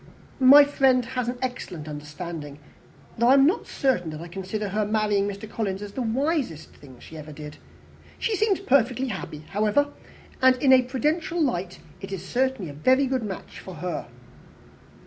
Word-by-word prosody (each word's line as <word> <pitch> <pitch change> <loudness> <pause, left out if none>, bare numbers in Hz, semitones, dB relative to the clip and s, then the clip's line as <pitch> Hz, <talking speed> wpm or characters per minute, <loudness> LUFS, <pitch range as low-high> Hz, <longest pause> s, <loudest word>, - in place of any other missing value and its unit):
My 275 +3 +9
friend 265 -3 +2
has 250 -1 -3
an 250 - -4
excellent 180 -11 -5
understanding 150 0 -7 0.6
though 235 - +4
I 260 - +7
am 275 0 +6
not 345 +9 +1
certain 245 - 0
that 155 -1 -7
I 170 - -8
consider 195 +3 -4
her 210 +2 0
marrying 210 -1 +1
Mr. 200 +1 -6
Collins 205 -3 -3
as 205 - -7
the 255 - -4
wisest 250 - -1
thing 130 -3 -15
she 160 - -11
ever 155 0 -9
did. 150 0 -9 0.6
She 450 - -1
seems 415 -1 +1
perfectly 260 - +2
happy, 155 -7 -6
however; 215 +8 +2 0.5
and, 260 0 +6
in 265 +1 +4
a 260 - +7
prudential 300 +7 -1
light, 190 - -1 0.2
it 195 - -7
is 190 -1 -5
certainly 255 - -1
a - - -10
very 260 - +3
good 260 -1 -1
match 200 -4 -7
for 185 - -9
her." 175 +2 -4
220 Hz, 175 wpm, -25 LUFS, 180-265 Hz, 0.6 s, My